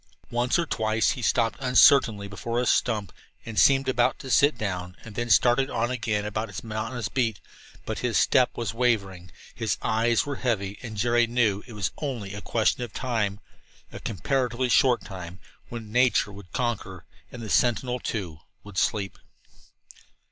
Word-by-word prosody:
Once 120 +4 +1
or 170 - +1
twice 110 -5 +1
he 125 - -5
stopped 115 -1 +1
uncertainly 125 -5 +5
before 115 +4 -3
a 125 - 0
stump 110 -5 +1 0.3
and 110 -3 -2
seemed 135 +2 +5
about 125 -1 +2
to 130 - -7
sit 145 +4 +4
down, 90 -3 -4
then 120 +2 -4
started 125 +4 +4
on 120 - -1
again 110 -4 -1
around 110 +2 -3
his 105 +5 -7
monotonous 110 0 -4
beat. 115 -5 -1 0.5
But - - -4
his - - 0
step 125 -1 +4
was 115 -1 -2
wavering, 100 -7 0 0.2
his 110 -4 -2
eyes 115 +3 +2
were 140 -2 -4
heavy, 100 -6 -2
and 110 -4 -7
Jerry 120 +2 +3
knew 115 -4 +1
it 120 - -10
was 105 -4 -2
only 120 -10 -4
a 105 - -6
question 115 +3 +1
of 120 -3 -5
time 110 -5 -2 0.5
a - - -8
comparatively 125 - -1
short 125 0 +4
time 90 -2 -8 0.3
when 115 -3 -7
nature 125 -3 +3
would 100 -3 -13
conquer, 110 -7 -3 0.3
and 120 -2 -8
the 110 - -6
sentinel, 125 +1 +1
too, 90 -10 -4 0.2
would 100 -3 -4
sleep. 100 -2 -1
115 Hz, 165 wpm, -26 LUFS, 105-125 Hz, 0.5 s, uncertainly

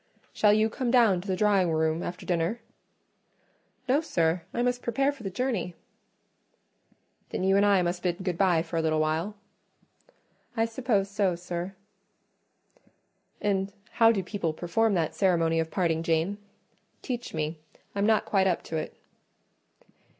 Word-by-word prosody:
"Shall 210 - +4
you 215 +1 +4
come 240 +3 -3
down 230 -7 +4
to 195 - -11
the 190 - 0
drawing 195 -3 +3
room 160 +1 +1
after 180 0 -6
dinner?" 175 +6 0 1.3
"No, 270 +4 +3
sir, 170 - 0
I 240 - -1
must 245 0 0
prepare 270 +4 +1
for 280 -4 -13
the 195 - -3
journey." 195 -5 -2 1.5
"Then - - -3
you 190 +1 +3
and 200 - +4
I 200 -3 +4
must 175 +1 -2
bid 180 0 -2
good 180 -2 -1
bye 175 -3 +3
for 165 0 -5
a - - +2
little 155 -1 +1
while?" 160 +7 -1 1.2
"I 225 - +3
suppose 225 -4 0
so, 200 -3 0
sir." 175 +2 -5 1.7
"And 195 -1 0 0.2
how 225 -1 +5
do 200 -4 -1
people 180 -4 -2
perform 200 +6 +1
that 165 -3 0
ceremony 165 -4 +2
of 160 0 -1
parting, 165 -3 0
Jane? 165 +5 0 0.6
Teach 245 - -4
me; 155 +1 -2 0.3
I'm 200 +1 +1
not 220 -1 +3
quite 190 -2 +2
up 180 - 0
to 160 - -4
it." 155 - -5
190 Hz, 155 wpm, -27 LUFS, 170-215 Hz, 1.7 s, how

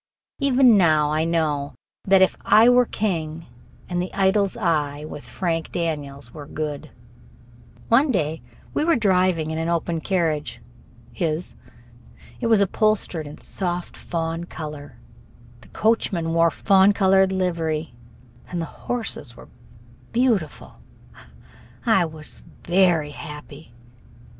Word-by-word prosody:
Even 260 -6 +5
now 155 -4 +3
I 155 +1 +1
know 155 -4 -1 0.3
that 195 -1 +5
"If 190 - +2
I 225 +2 +6
Were 245 -1 +5
King" 165 -6 -3 0.4
and 175 -1 -1
"The 180 - -4
Idol's 195 +2 +2
Eye", 150 -7 -1
with 150 - -8
Frank 165 -3 -2
Daniels, 145 -7 -4
were 145 -2 -9
good. 150 0 -5 1.0
One 265 +6 +4
day 160 - -1 0.3
we - - 0
went 325 -5 +2
driving 185 -6 +2
in 160 - -3
an 165 +1 -1
open 170 -1 -1
carriage 155 -10 -1 0.5
his. 160 +6 -2 0.9
It 235 - -1
was 220 -3 +4
upholstered 200 -5 0
in 145 - -11
soft 175 -2 -4
fawn 165 0 -4
color, 150 -4 -8 0.6
the - - -17
coachman 185 -7 0
wore 165 0 +4
fawn 190 - +4
colored 190 -1 +3
livery, 165 -5 -2 0.5
and 175 - -4
the 165 - -2 0.2
horses 220 - -4
were - - -14 0.6
beautiful. 230 - -1 1.1
I 195 -7 +4
was 155 -2 -11 0.2
very 175 -4 +2
happy. 150 -1 -10
170 Hz, 125 wpm, -23 LUFS, 155-195 Hz, 1.1 s, I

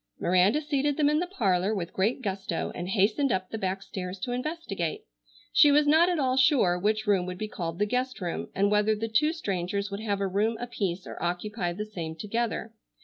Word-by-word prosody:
Miranda 185 - +3
seated 290 -1 0
them 295 -2 +4
in 300 - +2
the 355 - -1
parlor 200 - +1
with 175 -4 -4
great 225 +7 0
gusto 195 -4 -3
and 175 +1 -5
hastened 220 +7 +2
up 185 -2 -1
the 225 - -3
back 190 0 -2
stairs 180 0 -6
to 220 +6 -4
investigate. 245 - -3 0.5
She 305 -1 +7
was 295 +1 +5
not 320 +4 +5
at 355 - 0
all 260 -3 +1
sure 255 - +4
which 215 +3 0
room 195 -4 +2
would 180 0 -5
be 215 - -3
called 170 -5 -5
the 210 - +2
guest 250 +4 -2
room 175 -3 -4
and 200 +2 +2
whether 210 +1 +3
the 225 +2 -3
two 300 +8 +2
strangers 200 - -2
would 200 - -4
have 205 -3 -1
a 200 - 0
room 210 +4 0
apiece 195 -7 -3
or - - -8
occupy 175 +2 -2
the 210 +4 -4
same 170 -7 -6
together. 225 +5 -3
210 Hz, 210 wpm, -27 LUFS, 185-255 Hz, 0.5 s, She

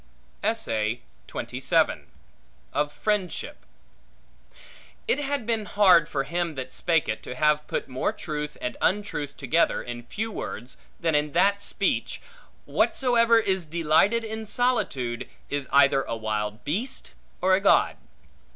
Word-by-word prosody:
Of 220 +2 +1 2.3
Friendship 195 +2 -2 1.4
IT 270 - +2
HAD 285 -4 -2
been 225 -2 0
hard 190 -7 +5
for 135 -2 -1
him 170 +2 -2
that 130 -1 -6
spake 165 -2 +1
it 110 - -2
to 125 - -7
have 150 +2 +2
put - - -3
more 130 +7 -1
truth 150 -8 -5
and 125 - -3
untruth 170 -8 -1
together 155 +5 +1
in 120 0 -6
few 220 +2 -3
words, 125 - -6 0.2
than 165 -2 +1
in 150 0 +1
that 200 +4 +3
speech, - - -1 0.5
Whatsoever 235 -3 +3
is 190 -6 -1
delighted 170 +8 +3
in 220 0 -5
solitude, 140 - 0 0.2
is 145 -2 -2
either 140 -1 +5
a 115 - -4
wild 110 0 -3
beast 225 - -2 0.3
or 185 +1 +3
a 190 - +4
god. 200 - +4
170 Hz, 125 wpm, -26 LUFS, 140-210 Hz, 2.3 s, hard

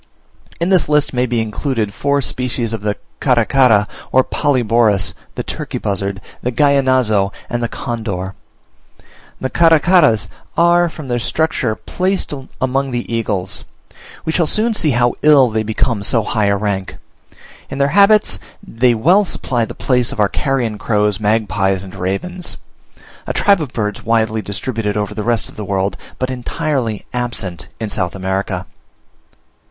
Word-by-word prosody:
In 170 +2 0
this 185 -5 +3
list 150 -1 +2
may 125 0 +1
be 120 -1 0
included 110 -1 -2
four 140 0 0
species 120 -2 -2
of 110 - -3
the 105 0 -2 0.2
Caracara 120 -4 +3 0.2
or 130 - +5
Polyborus, 115 - +2 0.2
the - - -3
Turkey - - -5
buzzard, 100 -1 -2 0.2
the 125 - -1
Gallinazo, 130 -7 +3 0.2
and 120 0 -1
the 120 - 0
Condor. 100 -6 -4 1.1
The 130 - -3
Caracaras 165 - +4 0.3
are, 175 0 +4
from 155 -3 -9
their 120 -1 0
structure, 125 -3 0
placed 185 - -1 0.3
among 135 +1 0
the 120 -2 -4
eagles: 100 -5 -1 0.6
we 160 - 0
shall 165 -1 +2
soon 220 +7 +2
see 165 -7 +2
how 120 -2 +2
ill 145 -4 +6
they 110 0 0
become 110 0 -1
so 110 +3 +2
high 105 0 0
a 100 0 +2
rank. 95 -2 -3 0.7
In - - -5
their 140 0 +2
habits 205 +5 +4 0.3
they 120 -2 +2
well 175 - +4
supply 120 - -1
the - - -9
place 125 -2 +1
of - - -7
our 105 -1 +3
carrion 120 -6 -1
crows, 105 -2 +1
magpies, 100 -3 +1
and 95 - -10
ravens; 175 - -3 0.7
a - - -1
tribe 200 -4 +3
of 145 -5 -4
birds 105 -3 -3
widely 110 -1 +1
distributed 105 +1 -3
over 105 0 -2
the 105 - -4
rest 115 +1 0
of - - -14
the 105 - -4
world, 95 -1 -1 0.2
but 130 0 -2
entirely 130 -3 -2
absent 120 -8 -3
in 110 - -2
South 95 -3 -2
America. 95 0 -2
120 Hz, 155 wpm, -17 LUFS, 105-140 Hz, 1.1 s, ill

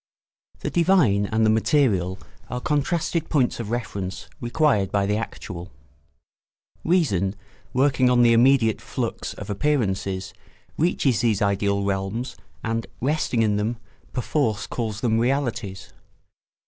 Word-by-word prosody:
] - - -37
The - - -3
divine 160 - +3
and 110 +1 +2
the 110 - +4
material 110 - +2 0.3
are 125 - -3
contrasted 160 +4 0
points 130 -7 +1
of 115 -3 -4
reference 105 -5 -4
required 120 - +1
by 100 -1 +2
the 105 +1 +1
actual. 90 -5 -6 1.1
Reason, 105 - +1 0.4
working 130 0 +3
on 125 -1 +5
the 120 -1 +6
immediate 120 -1 +4
flux - - -4
of - - -8
appearances, 100 -7 -1 0.4
reaches 150 - +1
these 110 -3 +2
ideal 100 0 +1
realms 100 +6 -2 0.3
and, 115 0 -2
resting 130 -4 +1
in 105 -2 +2
them, 110 +3 -1 0.3
perforce 125 -4 0
calls 110 -3 -4
them 115 -2 +2
realities. 120 -6 -2
115 Hz, 125 wpm, -24 LUFS, 100-135 Hz, 1.1 s, the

